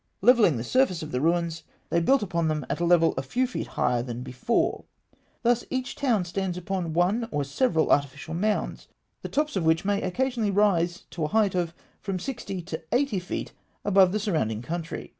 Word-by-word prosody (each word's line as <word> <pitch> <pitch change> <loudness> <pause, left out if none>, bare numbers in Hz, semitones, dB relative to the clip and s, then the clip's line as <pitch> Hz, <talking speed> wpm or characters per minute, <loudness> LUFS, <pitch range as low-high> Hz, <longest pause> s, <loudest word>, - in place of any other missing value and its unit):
Levelling 220 - +5
the 115 - -3
surface 185 - +2
of 155 - -7
the 125 - -1
ruins, 165 0 +1 0.3
they 170 - +3
built 265 +9 +3
upon 170 -4 0
them 155 -3 -1
at - - -2
a 175 - +1
level 170 -1 +4
a - - +1
few 245 - 0
feet 250 - -4
higher 120 -1 +2
than 120 0 -5
before: 130 - -1 0.6
thus 240 0 +3
each 260 -1 -3
town 235 -10 +1
stands 180 0 -3
upon 180 -2 -3
one 190 +8 +1
or 145 -7 -1
several 160 - +1
artificial 145 +2 0
mounds, 210 +5 -1 0.3
the - - -6
tops 300 -2 0
of 190 - 0
which 160 +2 +2
may 200 0 +1
occasionally 235 +3 0
rise 185 -4 +2
to 165 - -4
a - - 0
height 210 +1 +2
of 170 -2 -1 0.3
from 195 -2 -2
sixty 195 -4 -5
to 165 -2 -5
eighty 245 -4 +1
feet 180 - -5 0.3
above 195 -2 +5
the 210 - 0
surrounding 150 - -1
country. 165 +3 -5
180 Hz, 195 wpm, -26 LUFS, 160-215 Hz, 0.6 s, Levelling